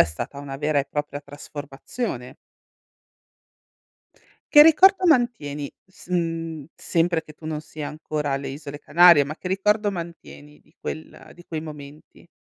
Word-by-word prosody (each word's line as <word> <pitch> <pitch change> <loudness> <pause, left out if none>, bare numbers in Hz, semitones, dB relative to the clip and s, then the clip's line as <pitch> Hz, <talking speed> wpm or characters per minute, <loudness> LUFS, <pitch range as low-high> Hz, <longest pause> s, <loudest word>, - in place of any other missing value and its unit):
è - - +9
stata 120 - -6
una 140 -1 -6
vera 150 +1 +1
e 140 - +1
propria 150 0 -4
trasformazione. 145 - -6 2.2
Che 295 -1 +11
ricordo 370 +4 +6
mantieni 235 - +1
s 190 -1 -17
mhmm, 165 -3 -2
sempre 170 0 0
che 155 - -14
tu 155 - -14
non 155 -1 -3
sia 155 -1 -7
ancora 150 -1 -3
alle 135 0 -2
isole 145 +1 -7
Canarie, 170 -1 +7
ma 145 +2 -6
che - - -6
ricordo 205 +2 +1
mantieni 165 -4 -9
di - - -29
quel 155 +1 -8
di 175 - -16
quei 160 -2 -4
momenti? 150 +1 -11
155 Hz, 145 wpm, -24 LUFS, 145-175 Hz, 2.2 s, Che